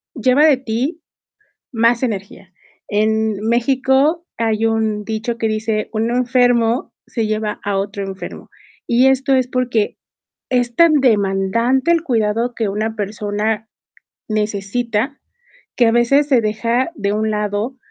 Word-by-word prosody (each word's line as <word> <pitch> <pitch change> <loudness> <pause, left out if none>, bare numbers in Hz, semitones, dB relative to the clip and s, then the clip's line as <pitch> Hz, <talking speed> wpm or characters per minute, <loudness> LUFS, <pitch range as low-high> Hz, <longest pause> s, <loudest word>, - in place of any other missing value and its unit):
lleva 255 +5 +4
de 290 -4 +5
ti 265 +7 -3 0.7
más 235 +1 +2
energía. 195 -4 -5 0.3
En 215 0 0
México 265 +7 +2
hay 225 -1 0
un 220 -2 0
dicho 225 +2 -3
que 225 - 0
dice: 215 0 -2
"Un 225 +1 -1
enfermo 245 -1 +2
se 225 -3 -2
lleva 215 -1 -2
a 200 -1 -1
otro 200 +1 -3
enfermo". 195 0 -8 0.4
Y 245 +3 +4
esto 265 +1 +2
es 255 -1 +2
porque 245 -4 -1 0.5
es 245 -2 0
tan 335 -2 +5
demandante 230 - +2
el 335 -1 +2
cuidado 230 -2 0
que 220 -3 -1
una 220 +2 -2
persona 210 +1 -2 0.6
necesita, 215 +5 -2 0.6
que 240 -2 +4
a - - +4
veces 275 +5 +3
se 255 -5 +3
deja 230 +7 0
de 200 0 -1
un 215 +1 0
lado 210 +4 -2
225 Hz, 135 wpm, -18 LUFS, 215-255 Hz, 0.7 s, de